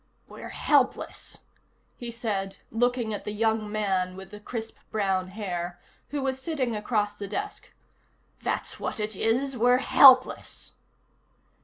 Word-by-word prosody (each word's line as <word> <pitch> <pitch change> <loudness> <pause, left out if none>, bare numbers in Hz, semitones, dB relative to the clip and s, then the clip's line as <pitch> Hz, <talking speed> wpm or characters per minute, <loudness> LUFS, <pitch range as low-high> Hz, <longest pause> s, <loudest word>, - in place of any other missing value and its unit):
"We're - - -9
helpless," - - 0 0.5
he 240 - -6
said, 205 -5 -3
looking 240 -1 +1
at 205 - -4
the 210 - -4
young 220 0 0
man 190 -4 0
with 190 0 -10
the 210 - -9
crisp 225 +1 -6
brown 190 -3 0
hair 180 -3 -4 0.3
who 285 -2 -2
was 265 0 -1
sitting 260 -6 -1
across 210 -1 0
the 205 -1 -7
desk. 410 - -5 0.7
"That's - - -2
what - - -3
it 210 0 -2
is, 255 +7 0
we're 245 +1 +4
helpless." 260 0 +5
220 Hz, 135 wpm, -27 LUFS, 200-245 Hz, 0.7 s, helpless